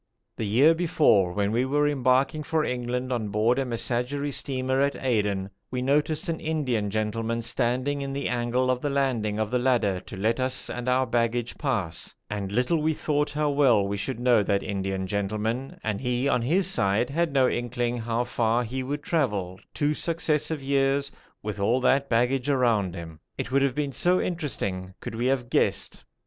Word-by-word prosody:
The 110 Hz, -, -3 dB
year 135 Hz, +10 st, +5 dB
before, 150 Hz, -, +3 dB
when 100 Hz, +2 st, 0 dB
we 120 Hz, +3 st, +2 dB
were 145 Hz, +3 st, +2 dB
embarking 135 Hz, +1 st, +2 dB
for 155 Hz, +1 st, 0 dB
England 125 Hz, +1 st, -2 dB
on 115 Hz, -3 st, -2 dB
board 110 Hz, +5 st, +2 dB
a 135 Hz, -, 0 dB
Messageries 125 Hz, +4 st, -2 dB
steamer 130 Hz, 0 st, 0 dB
at 140 Hz, 0 st, +1 dB
Aden, 105 Hz, -6 st, -1 dB, 0.2 s
we 125 Hz, 0 st, -3 dB
noticed 150 Hz, +5 st, +1 dB
an 165 Hz, -1 st, -2 dB
Indian 130 Hz, -10 st, -1 dB
gentleman 115 Hz, +2 st, -2 dB
standing 125 Hz, +5 st, 0 dB
in 140 Hz, 0 st, -4 dB
the 140 Hz, +1 st, -2 dB
angle 125 Hz, +1 st, 0 dB
of 125 Hz, -1 st, -2 dB
the 145 Hz, -, -1 dB
landing 125 Hz, -7 st, 0 dB
of 110 Hz, -1 st, -1 dB
the 125 Hz, -, +2 dB
ladder 120 Hz, -7 st, +1 dB
to 95 Hz, -, -10 dB
let 110 Hz, +5 st, 0 dB
us 130 Hz, 0 st, +1 dB
and 125 Hz, +1 st, -3 dB
our 130 Hz, +1 st, +3 dB
baggage 120 Hz, 0 st, -1 dB
pass, 110 Hz, -, -1 dB, 0.2 s
and 100 Hz, -2 st, -3 dB
little 125 Hz, +9 st, +1 dB
we 160 Hz, +1 st, +1 dB
thought 150 Hz, -1 st, 0 dB
how 150 Hz, 0 st, 0 dB
well 125 Hz, -8 st, +4 dB
we 100 Hz, -, -2 dB
should 110 Hz, +5 st, -4 dB
know 120 Hz, -3 st, +4 dB
that 100 Hz, 0 st, 0 dB
Indian 95 Hz, -1 st, -2 dB
gentleman, 110 Hz, +6 st, -2 dB
and 105 Hz, -2 st, -2 dB
he 125 Hz, +1 st, 0 dB
on 125 Hz, -, +2 dB
his 170 Hz, +11 st, +2 dB
side 115 Hz, -, +2 dB
had 165 Hz, +1 st, 0 dB
no 135 Hz, -2 st, +4 dB
inkling 120 Hz, 0 st, -1 dB
how 115 Hz, +1 st, -1 dB
far 120 Hz, 0 st, +1 dB
he 130 Hz, +3 st, -4 dB
would 145 Hz, +3 st, -4 dB
travel, 105 Hz, -, -1 dB
two 150 Hz, 0 st, 0 dB
successive 155 Hz, -2 st, -1 dB
years, 140 Hz, 0 st, +1 dB, 0.3 s
with 105 Hz, -1 st, -4 dB
all 115 Hz, +6 st, +2 dB
that 135 Hz, +2 st, +2 dB
baggage 125 Hz, +3 st, +1 dB
around 115 Hz, -9 st, +2 dB
him; 80 Hz, -3 st, -8 dB, 0.2 s
it -, -, -4 dB
would 135 Hz, +1 st, +3 dB
have 135 Hz, -2 st, +1 dB
been 145 Hz, -2 st, -1 dB
so 180 Hz, +6 st, +2 dB
interesting 100 Hz, -, -3 dB
could -, -, -7 dB
we 120 Hz, +3 st, -1 dB
have 130 Hz, -2 st, 0 dB
guessed. -, -, 0 dB
125 Hz, 185 wpm, -26 LUFS, 110-140 Hz, 0.3 s, year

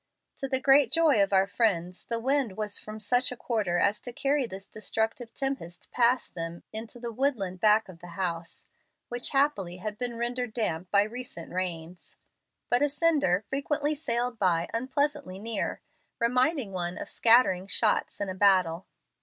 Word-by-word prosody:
To 270 Hz, -, -3 dB
the 260 Hz, -1 st, 0 dB
great 270 Hz, -2 st, +5 dB
joy 310 Hz, -8 st, +4 dB
of 195 Hz, -, +2 dB
our 190 Hz, 0 st, +4 dB
friends 185 Hz, -5 st, -1 dB
the 230 Hz, -, -2 dB
wind 260 Hz, -4 st, 0 dB
was 210 Hz, -1 st, -2 dB
from 215 Hz, 0 st, -8 dB
such 245 Hz, +5 st, +1 dB
a 250 Hz, -, -6 dB
quarter 210 Hz, -9 st, -1 dB
as 200 Hz, +3 st, +2 dB
to 245 Hz, -, -6 dB
carry 275 Hz, +1 st, 0 dB
this 195 Hz, -1 st, -8 dB
destructive 220 Hz, +3 st, -2 dB
tempest 270 Hz, -11 st, -4 dB
past 245 Hz, +1 st, +2 dB
them 165 Hz, 0 st, -6 dB
into 225 Hz, +2 st, -7 dB
the 235 Hz, -1 st, -5 dB
woodland 220 Hz, -8 st, -1 dB
back 215 Hz, +1 st, +4 dB
of 180 Hz, -3 st, -12 dB
the 175 Hz, -1 st, -11 dB
house, 170 Hz, -3 st, -3 dB, 0.4 s
which 245 Hz, 0 st, -1 dB
happily 270 Hz, -11 st, +1 dB
had 210 Hz, +3 st, -5 dB
been 245 Hz, -2 st, -4 dB
rendered 240 Hz, 0 st, -2 dB
damp 180 Hz, -6 st, -2 dB
by 200 Hz, 0 st, +4 dB
recent 230 Hz, -5 st, -7 dB
rains. 175 Hz, -1 st, -5 dB, 0.5 s
But 245 Hz, -, +2 dB
a 290 Hz, -, +3 dB
cinder 280 Hz, -, +2 dB
frequently 290 Hz, +2 st, -1 dB
sailed 245 Hz, -5 st, -2 dB
by 175 Hz, -3 st, +2 dB
unpleasantly 260 Hz, -5 st, -1 dB
near, 225 Hz, +3 st, -3 dB, 0.4 s
reminding 250 Hz, 0 st, +1 dB
one 175 Hz, -1 st, -3 dB
of -, -, -6 dB
scattering 225 Hz, -6 st, +4 dB
shots 215 Hz, +1 st, +2 dB
in 200 Hz, -, -2 dB
a 185 Hz, -, -3 dB
battle. 185 Hz, -3 st, +3 dB
220 Hz, 170 wpm, -28 LUFS, 185-255 Hz, 0.5 s, great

